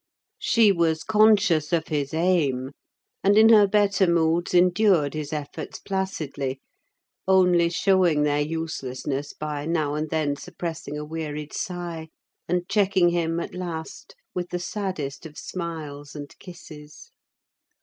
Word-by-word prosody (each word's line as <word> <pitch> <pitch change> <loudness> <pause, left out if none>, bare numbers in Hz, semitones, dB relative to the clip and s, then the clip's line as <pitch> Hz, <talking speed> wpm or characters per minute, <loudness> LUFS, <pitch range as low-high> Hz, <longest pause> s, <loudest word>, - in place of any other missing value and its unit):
She 225 -4 +4
was 165 -3 +1
conscious 210 -8 +3
of 170 -2 0
his 145 -3 -1
aim, 155 -6 +1 0.5
and 200 +1 +4
in 220 +1 +7
her 210 -3 +7
better 200 -2 +3
moods 170 0 +1
endured 180 -4 +4
his 155 -1 -5
efforts 150 -2 -5
placidly, 155 -9 -3 0.7
only 180 -3 +4
showing 175 -4 +2
their 145 0 +1
uselessness 145 -3 -4
by 150 -1 -4
now 155 -3 0
and 155 +1 -3
then 150 -2 -1
suppressing 160 -2 -6
a 150 - -5
wearied 150 -1 -5
sigh, 175 -3 -5 0.4
and 180 0 -1
checking 190 -4 +3
him 170 -1 0
at - - -5
last 180 - -7 0.2
with 180 -1 -4
the 180 - -2
saddest 175 -6 -4
of 150 - -16
smiles 155 -5 -6
and 145 -1 -8
kisses. 160 - -12
165 Hz, 130 wpm, -24 LUFS, 150-185 Hz, 0.7 s, in